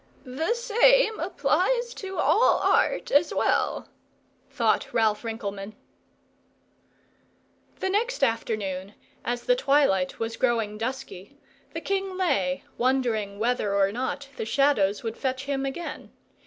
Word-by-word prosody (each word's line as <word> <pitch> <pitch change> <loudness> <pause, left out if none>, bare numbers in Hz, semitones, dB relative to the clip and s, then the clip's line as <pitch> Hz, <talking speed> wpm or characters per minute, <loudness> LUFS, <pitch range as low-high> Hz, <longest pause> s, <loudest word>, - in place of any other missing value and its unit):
"The 315 - -1
same 475 -1 +4
applies 375 - 0
to 385 -1 -7
all 485 +3 +4
arts - - +1
as 290 +4 +4
well," - - 0 0.6
thought - - 0
Ralph 215 -2 +2
Rinkelmann. 210 -2 -5 2.0
The 380 - -2
next 450 - 0
afternoon, 210 -5 -1 0.3
as 240 0 -2
the - - +3
twilight 275 - +2
was 225 0 -3
growing 225 -4 0
dusky, 255 -1 -6 0.4
the - - -3
king 390 -1 -2
lay 275 -6 0 0.2
wondering 235 -6 0
whether 220 -2 0
or 195 0 +3
not 260 +4 -3
the - - -2
Shadows 225 -6 +2
would 225 -1 -4
fetch 260 -1 -2
him 275 -1 -2
again. 340 +6 -6
260 Hz, 120 wpm, -26 LUFS, 215-345 Hz, 2.0 s, same